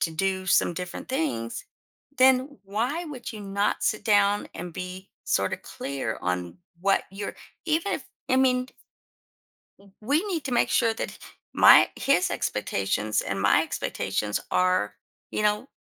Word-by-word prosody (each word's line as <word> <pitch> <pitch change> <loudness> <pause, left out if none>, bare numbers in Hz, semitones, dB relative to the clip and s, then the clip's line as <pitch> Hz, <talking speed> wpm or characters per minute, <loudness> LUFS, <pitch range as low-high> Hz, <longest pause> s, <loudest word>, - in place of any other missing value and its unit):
to 165 - +1
do 190 +2 -1
some 175 - +3
different 180 0 -6
things, 260 - -2 0.5
then 260 +2 +4
why 245 - -2
would 260 -5 -7
you 215 - -8
not 200 +1 0
sit 215 - 0
down 205 -1 +3
and 175 -2 -6
be 185 +2 -7 0.2
sorta 95 0 +1
clear 140 -1 -5
on 90 -1 -2 0.3
what 195 +1 +3
you're 200 +1 -5 0.3
even 330 +5 0
if - - -6 0.3
I 260 - +4
mean 255 -1 +2 1.1
w 200 -1 -20
we 280 +8 +2
need 325 -5 -2
to 255 - -2
make - - +2
sure 230 -2 +2
that - - -5 0.4
my - - +9 0.2
his 230 -10 +2
expectations 105 +1 -1
and 95 0 -3
my - - +5
expectations 105 -1 -2
are, 185 - +1 0.4
you - - -1
know 210 +5 +1
200 Hz, 150 wpm, -26 LUFS, 175-255 Hz, 1.1 s, my